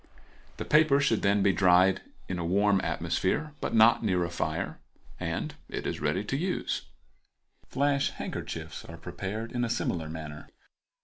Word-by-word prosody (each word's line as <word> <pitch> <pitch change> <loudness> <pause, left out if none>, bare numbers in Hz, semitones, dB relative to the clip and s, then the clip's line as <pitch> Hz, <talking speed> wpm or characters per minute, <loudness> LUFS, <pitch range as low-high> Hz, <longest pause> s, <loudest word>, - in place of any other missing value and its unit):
The - - -4
paper 150 -2 +5
should 130 -6 +2
then 100 0 +3
be 100 -1 +4
dried 95 0 +4 0.3
in 90 -2 -3
a - - -2
warm 100 +3 +3
atmosphere, 150 +11 -1
but - - -1
not 115 +1 +6
near 90 -4 +2
a 85 - -3
fire, 85 - -2 0.4
and - - -3 0.2
it - - -4
is - - -3
ready 75 +6 0
for 135 +6 -2
use. 180 +4 -2 0.8
Flash 140 0 +1
handkerchiefs - - -6
are 80 - -10
prepared 95 +6 -5
in 120 -1 -1
a 120 - 0
similar 85 -8 -1
manner. 75 -2 -8
100 Hz, 160 wpm, -29 LUFS, 90-120 Hz, 0.8 s, not